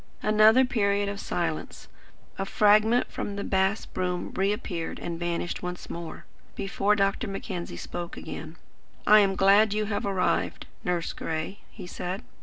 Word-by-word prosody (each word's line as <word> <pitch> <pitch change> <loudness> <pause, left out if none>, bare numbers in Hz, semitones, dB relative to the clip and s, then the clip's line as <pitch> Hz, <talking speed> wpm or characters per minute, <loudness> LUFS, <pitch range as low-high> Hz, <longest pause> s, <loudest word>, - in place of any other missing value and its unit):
Another 215 +4 +6
period 205 -4 +1
of 200 0 -5
silence. 165 -5 -3 0.5
A 195 - 0
fragment 215 +4 +4
of 205 -5 -3
the 200 - -3
bass 190 +2 +1
broom 180 -1 -3
reappeared 190 -3 -2
and 170 -1 -5
vanished 175 0 -2
once 180 0 -6
more, 170 -1 -7 0.3
before 200 +1 +1
Dr. 200 +3 +1
Mackenzie 190 - -5
spoke 175 - -6
again. 160 +1 -7 0.5
"I 215 0 +8
am 195 -2 +3
glad 200 +2 +5
you 215 0 0
have 205 -1 -2
arrived, 190 -2 0 0.2
Nurse 175 -2 -1
Gray," 160 +5 -4
he 195 - -10
said. 180 +3 -5
195 Hz, 145 wpm, -27 LUFS, 175-210 Hz, 0.5 s, I